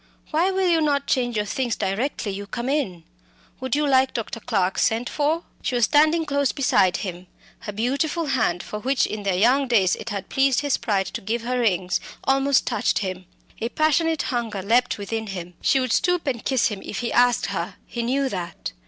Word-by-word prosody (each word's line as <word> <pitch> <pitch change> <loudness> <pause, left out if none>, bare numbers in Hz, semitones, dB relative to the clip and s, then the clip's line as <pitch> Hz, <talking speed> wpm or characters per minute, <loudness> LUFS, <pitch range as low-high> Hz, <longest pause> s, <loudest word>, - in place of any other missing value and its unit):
Why 335 +4 +2
will 380 -1 +1
you 335 -2 +3
not 285 -2 +1
change 245 -2 0
your 210 -1 0
things 240 +2 -1
directly 210 +3 -2
you 200 +1 -6
come 240 +4 -4
in? 235 - -1 0.6
Would 260 0 -1
you 295 0 +1
like 265 -1 +3
Dr. 230 0 -4
Clarke 195 -5 0
sent 230 +2 +1
for?" 310 +3 0 0.2
She 255 - -2
was 240 -2 +4
standing 310 +2 +3
close 280 -2 +1
beside 205 -10 +2
him; 180 -1 -7 0.3
her 225 -3 -6
beautiful 280 +10 -1
hand, 225 - 0
for 210 - -6
which 265 +4 +1
in 215 - -4
their 195 -2 0
young 250 +8 +3
days 200 -7 +3
it 220 - -7
had 200 -2 -4
pleased 270 0 +2
his 285 -2 +1
pride 195 -4 0
to - - -4
give 225 +4 -2
her 250 +1 -1
rings, 185 -5 +1 0.2
almost 270 0 +3
touched - - 0
him. 185 0 -5 0.3
A 230 - -2
passionate 315 +2 +1
hunger 225 -5 -2
leapt 240 +5 +2
within 220 +2 -4
him. 180 -3 -6
She 270 - +3
would 255 -3 0
stoop 360 -2 +1
and 250 -5 -2
kiss 260 -4 +2
him 210 -3 -6
if 210 - -5
he 235 - -2
asked 245 0 +4
her; - - -3
he 235 - -4
knew 270 +4 0
that. 180 -8 -5
240 Hz, 205 wpm, -23 LUFS, 205-280 Hz, 0.6 s, was